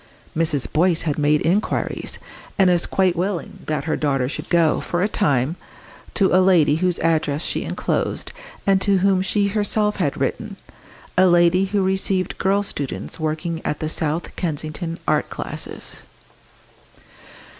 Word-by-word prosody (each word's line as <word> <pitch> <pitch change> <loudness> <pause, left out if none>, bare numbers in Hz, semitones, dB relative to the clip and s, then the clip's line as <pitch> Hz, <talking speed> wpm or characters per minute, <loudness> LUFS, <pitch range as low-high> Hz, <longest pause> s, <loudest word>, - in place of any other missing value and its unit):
Mrs. 155 -4 +2
Boyce 170 +1 +3
had 150 -2 -1
made 150 0 +2
inquiries, 190 +6 -1 0.4
and 190 -3 +5
was 175 -1 +1
quite 185 -2 +2
willing 180 0 -3
that 150 -2 -1
her 155 +1 -1
daughter 135 -4 0
should 150 +2 -5
go, 165 -3 +3
for 175 +1 -1
a - - +3
time, 150 - 0 0.6
to 195 -3 +3
a 185 - +6
lady 170 -6 +4
whose 180 0 0
address 155 -2 +1
she - - -2
enclosed, - - -2 0.3
and 195 -1 +3
to 200 -1 +3
whom 190 0 +3
she 200 +1 +1
herself 210 0 +1
had 145 -8 -1
written 200 +10 -2 0.6
a 185 - +6
lady 175 +2 +4
who 200 0 0
received 190 0 0
girl 200 +1 +2
students 145 -7 -5
working 160 +1 -2
at 150 - -2
the 155 - -2
South 160 +1 -2
Kensington 165 +1 -3
art - - +1
classes. - - -5
175 Hz, 150 wpm, -21 LUFS, 155-190 Hz, 0.6 s, a